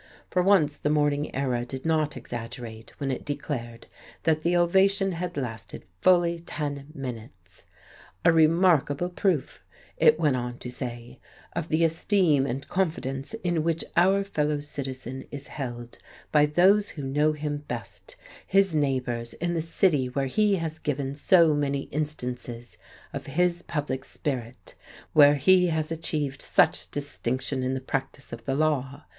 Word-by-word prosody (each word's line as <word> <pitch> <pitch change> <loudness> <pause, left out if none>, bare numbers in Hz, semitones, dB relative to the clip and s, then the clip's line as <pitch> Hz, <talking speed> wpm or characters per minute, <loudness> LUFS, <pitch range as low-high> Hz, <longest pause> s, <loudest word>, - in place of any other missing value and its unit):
For 180 - +2
once 175 -6 +3
the 150 - -1
Morning 145 -1 +1
Era 130 -3 0
did 130 +3 -7
not 155 -3 +1
exaggerate 115 -2 -8
when 140 -2 -1
it 130 - -4
declared 120 -5 -5 0.4
that 160 -1 +2
the 170 +3 +1
ovation 195 +3 +3
had 180 0 -4
lasted 120 -5 -5 0.2
fully 175 -2 +4
ten 145 -4 -5
minutes. 110 -8 -9 0.6
"A - - +8
remarkable 165 -1 +3
proof" 180 -5 -1 0.3
it 155 +1 +5
went 150 -5 +3
on 120 -1 -4
to 125 - -7
say, 120 -1 -6 0.4
"of 170 -1 -3
the 160 +2 +2
esteem 165 -3 +2
and 130 +2 -4
confidence 155 -3 -2
in 175 -3 +1
which 165 0 0
our 190 +3 +4
fellow 150 -6 -1
citizen 130 -3 -6
is 140 -1 -8
held 120 -4 -6 0.3
by 150 -1 +5
those 195 +7 +4
who 145 - -4
know 150 +3 +2
him 150 -1 -3
best, 120 -4 -7 0.3
his 195 -2 +3
neighbours 130 -5 -1
in 175 +1 -2
the 165 - 0
city 160 -4 +2
where 135 +2 -1
he 205 +9 +2
has 160 -3 -4
given 140 -3 -2
so 165 +2 +5
many 140 -1 0
instances 125 -5 -4 0.4
of - - -6
his 175 +4 +1
public 145 -6 -3
spirit, 125 -4 -5 0.4
where 145 -1 +7
he 180 +5 +5
has 160 -1 -1
achieved 150 -4 -2
such - - +2
distinction 130 -2 -3
in 130 +1 -1
the - - -2
practice 135 0 -4
of 115 0 -8
the 135 - 0
law. 145 -2 0
145 Hz, 150 wpm, -26 LUFS, 130-165 Hz, 0.6 s, A